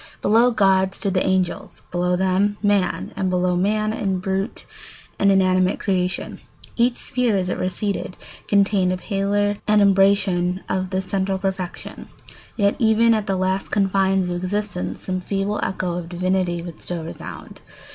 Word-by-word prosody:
Below 230 +4 +5
God 190 -4 +2
stood 195 - -2
the 185 - +2
angels, 185 -2 -1
below 180 0 +1
them 190 +3 +1
man, 200 -3 +1
and 190 - -1
below 180 0 +1
man 215 +4 +1
the 195 -4 -1
brute 195 +2 -3 0.5
and 200 0 +4
inanimate 185 -1 +3
creation. 185 -2 -2 0.4
Each 240 +1 +2
sphere, 245 -4 -1
as 185 -2 0
it - - -2
receded, 185 +1 -3 0.3
contained 200 -2 +3
a 185 - -1
paler 205 +1 0
adumbration 195 -3 +3
of 185 0 -2
the 190 0 -1
central 190 0 -1
perfection; 190 -2 -5 0.5
yet 200 -2 +2
even 230 0 +4
at 215 -1 -1
the 195 - 0
last 190 +1 -1
confines 195 -2 +1
of 175 - -2
existence 185 - -3
some 185 -1 -3
feeble 200 +2 -2
echo 180 -2 -2
of 170 -1 -8
divinity 180 -1 -1
would 170 -2 -9
still 175 -2 -4
resound. 160 - -9
190 Hz, 150 wpm, -22 LUFS, 185-205 Hz, 0.5 s, Below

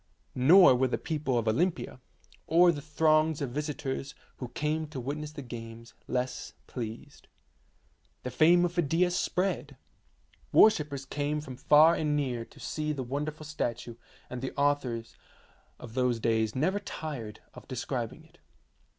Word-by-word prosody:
Nor 165 +5 +7
were 130 +1 +2
the 125 - -1
people 150 -5 -2
of 115 -1 -1
Olympia, 165 +5 0 0.5
or 175 +2 +6
the 145 -3 -5
throngs 155 0 +2
of 140 -4 -3
visitors 140 -1 -4 0.2
who 125 - -5
came 150 +5 -2
to 150 -3 -7
witness 145 +4 -4
the 145 -2 -7
games, 115 -1 -9
less 125 0 -3
pleased. 115 -3 -8 1.0
The 125 - -4
fame 175 +5 +5
of 175 - -2
Phidias 175 +2 +1
spread. 185 +2 -1 0.7
Worshippers 150 -10 +4
came 145 +2 -2
from 135 -4 -8
far 155 +5 +6
and 150 -3 0
near 125 -5 -1
to - - -19
see 155 -1 -3
the 135 -3 -4
wonderful 150 +4 -4
statue, 120 -6 -3 0.3
and 125 - -6
the 130 - -5
authors 140 -5 0 0.6
of 115 - -11
those 125 -2 +1
days 110 -1 +1
never 185 +10 +1
tired 140 - -6
of - - -13
describing - - -4
it. - - -24
145 Hz, 145 wpm, -29 LUFS, 125-155 Hz, 1.0 s, Nor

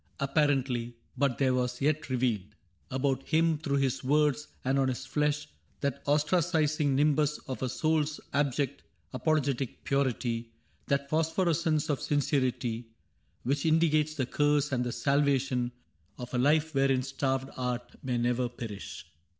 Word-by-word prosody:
Apparently; 135 -4 +1 0.2
but 130 -2 +1
there 130 -2 +2
was 125 -1 -1
yet 150 +1 0
revealed 115 -6 -1 0.3
About 135 0 0
him, 160 +1 +2
through 140 -3 0
his 135 -2 0
words 150 +1 +2 0.2
and 135 +1 +2
on 135 - +3
his 130 0 -3
flesh, 150 +2 0 0.4
Th^t 140 - -1
ostracizing 155 -1 +2
nimbus 150 +1 +2
of 130 - -5
a 130 - 0
souPs 155 +1 0
Abject, 140 -1 0 0.3
apologetic 140 -2 0
purity 120 -4 0 0.2
— - - -38
That 140 0 0
phosphorescence 160 0 +1
of 145 -4 -1
sincerity 130 -5 0 0.3
— - - -41
Which 140 +3 0
indicates 155 -1 +3
the 135 -4 0
curse 145 +2 +1
and 125 -2 +1
the 120 - -2
salvation 135 -3 +1 0.5
Of 125 0 -8
a 125 - +1
life 155 +4 +3
wherein 135 -2 +2
starved 135 0 -1
art 125 -1 -3
may 125 -2 -1
never 120 +1 +1
perish. 115 -5 -7
140 Hz, 140 wpm, -29 LUFS, 125-150 Hz, 0.5 s, on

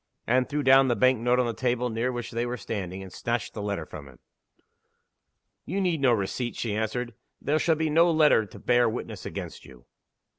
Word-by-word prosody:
Anne 125 +2 +2
threw 145 +2 -2
down 135 0 +6
the 120 - +2
bank 130 +2 +3
note 125 +2 +2
on 125 - +2
the 120 - -2
table 125 +1 -1
near 115 +3 -1
which 120 -2 -5
they 115 +1 -1
were 120 +1 -3
standing, 95 -5 -5
and 95 -2 -11
snatched 120 -1 -3
the 105 - -6
letter 100 -5 -3
from 70 -2 -10
him. 65 - -16 1.5
"You 195 - -3
need 175 -6 0
no 130 -3 +4
receipt," 115 +3 -2
she 110 -3 -3
answered. 110 +3 -2 0.3
"There 150 +3 0
shall 165 0 +2
be 160 0 -1
no 165 +3 +5
letter 155 -9 +4
to - - -13
bear 120 -1 +2
witness 115 - -6
against - - -7
you!" 60 -3 -16
120 Hz, 210 wpm, -26 LUFS, 110-130 Hz, 1.5 s, down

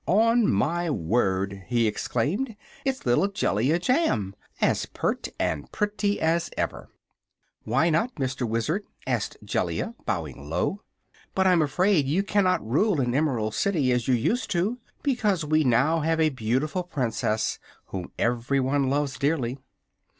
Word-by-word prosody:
"On 230 +3 +4
my 165 - +1
word," 95 - 0
he 120 -1 +2
exclaimed, 165 - -1 0.3
"it's 270 -1 -2
little 120 +11 +3
Jellia 155 - +1
Jamb 175 - +1 0.2
as - - +1
pert - - -2
and 75 -3 -2
pretty 205 0 0
as 165 +1 +1
ever!" - - -3 0.8
"Why 135 +9 +2
not, 225 +11 +1
Mr. 130 -3 -2
Wizard?" 150 - 0 0.2
asked - - -1
Jellia, 230 - -1
bowing 75 -7 -3
low. 90 - -1 0.5
"But 190 - +2
I'm 180 -3 +5
afraid 155 +1 +2
you 170 +8 +1
cannot 185 - +1
rule 185 - +2
the 140 - +1
Emerald 125 -8 0
City, 155 -10 +1
as 125 -2 0
you 130 - +4
used 225 - 0
to, 200 +8 0 0.2
because 210 - +1
we 155 +1 +3
now 135 +6 +3
have 160 +1 0
a 160 -1 +4
beautiful 130 +7 -1
Princess 125 -9 -1 0.3
whom 90 -2 -5
everyone 130 +3 +1
loves 140 -1 -1
dearly." 140 -3 0
145 Hz, 140 wpm, -26 LUFS, 120-185 Hz, 0.8 s, I'm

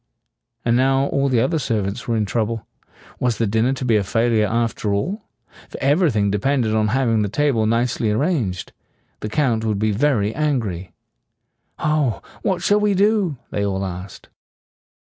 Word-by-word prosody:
And 120 0 +3
now 135 +2 +3
all 140 0 +1
the 125 -3 +2
other 140 +7 +1
servants 105 -6 -2
were 115 -1 +1
in 105 - +1
trouble. 115 +1 -2 0.5
Was 125 -3 0
the 115 - +1
dinner 110 +5 +1
to 130 -1 -4
be 115 -3 +3
a 100 - +1
failure 115 +1 +2
after 115 -2 -1
all? 190 - -2 0.5
For - - -8
everything 135 - +2
de 105 - 0
pend 135 +2 +1
ed 110 - 0
on 110 -1 +2
having 115 -2 +1
the 105 - 0
table 130 -3 +1
nicely 115 0 +1
arranged. 110 - -1 0.5
The 110 - -4
Count 120 -4 +1
would 110 -2 0
be 110 +1 +1
very 110 -2 +1
angry. 115 - -2 0.9
"Ah, 150 -7 0 0.2
what 185 -2 -1
shall 205 +1 +3
we 210 -1 +2
do?" 200 -6 +2
they 100 - -1
all 95 -1 -1
asked. 90 +1 -8
115 Hz, 170 wpm, -21 LUFS, 105-140 Hz, 0.9 s, And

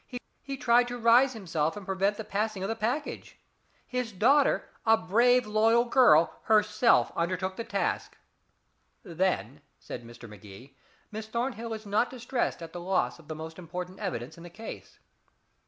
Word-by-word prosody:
He 275 0 -6
tried 245 -1 +3
to 245 0 -5
rise 240 +3 +5
himself 165 -6 -2
and 205 - -8
prevent 195 +2 0
the 220 - -5
passing 210 -1 -2
of 195 - -2
the 225 - -1
package. 245 +7 -3 0.5
His 250 -2 -3
daughter 265 +9 +3 0.2
a 225 0 +5
brave 240 +6 +3
loyal 225 +3 +3
girl 170 - +4
herself 215 +2 +3
undertook 185 +2 -2
the 230 - -4
task." - - -2 0.9
"Then," 155 - -2 0.2
said 120 - -8
Mr. 120 0 -12
Magee, 105 +4 -13 0.4
"Miss 215 +1 -6
Thornhill 235 0 -3
is 220 -1 -6
not 205 +4 +1
distressed 245 -7 -3
at 165 - -9
the 175 - -6
loss 185 -1 0
of 160 - -17
the 155 - -5
most 160 +2 -8
important 180 +2 -7
evidence 160 - -5
in - - -11
the 175 - -9
case." 220 +6 -10
210 Hz, 160 wpm, -28 LUFS, 170-235 Hz, 0.9 s, rise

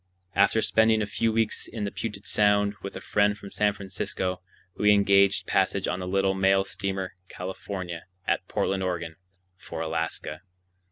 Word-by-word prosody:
After 100 +3 +3
spending 110 0 +3
a - - 0
few 115 +2 0
weeks 110 -1 0
in 110 - -5
the 100 - -2
Puget 100 0 -5
Sound 105 -1 +3
with 100 - -6
a - - -6
friend 105 0 +2
from 100 -1 -10
San 105 -1 +2
Francisco, 95 -1 -3 0.3
we 105 0 +4
engaged 100 -1 +4
passage - - +1
on - - -1
the 90 - -4
little 95 +1 +2
mail 95 0 +3
steamer 95 -1 -3 0.2
California, 90 -2 -6 0.2
at - - 0
Portland, 95 0 0
Oregon, 85 -3 -2 0.4
for 85 - -8
Alaska. 80 -1 -3
100 Hz, 160 wpm, -27 LUFS, 95-105 Hz, 0.4 s, we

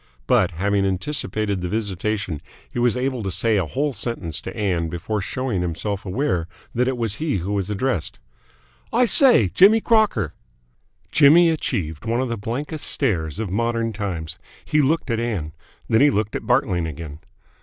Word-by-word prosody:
But, - - +3
having 100 +4 +1
anticipated 100 -1 -1
the 90 - -3
visitation, 100 -4 -2 0.3
he - - -5
was 120 0 +2
able 130 -1 -1
to 100 - -3
say 110 +4 +1
a 90 -5 0
whole 140 - -1
sentence 105 - -4
to - - -7
Ann 90 -6 0
before 100 +6 -3
showing 120 -1 -2
himself 95 +4 -3
aware 95 - -1 0.3
that 125 +2 +1
it 130 -1 -1
was 115 -3 -1
he 150 -7 -1
who 95 +3 -3
was 100 -1 -1
addressed. 105 - -2 0.7
"I 245 +2 +4
say! 240 - +5
Jimmy 205 - +6
Crocker!" 215 - +2 0.8
Jimmy 165 +3 +6
achieved 90 - -2
one 115 +2 0
of 130 -1 -1
the 115 - -1
blankest 140 +9 -4
stares 85 - -1
of 105 -4 -3
modern 115 +1 0
times. 85 -6 -4 0.3
He 150 -1 +2
looked 145 -1 +1
at 115 - 0
Ann. 105 -10 -2 0.4
Then 110 - +3
he 145 - +7
looked 105 -4 -1
at - - -5
Bartling 95 -10 +1
again. 75 -1 -7
110 Hz, 170 wpm, -22 LUFS, 90-130 Hz, 0.8 s, he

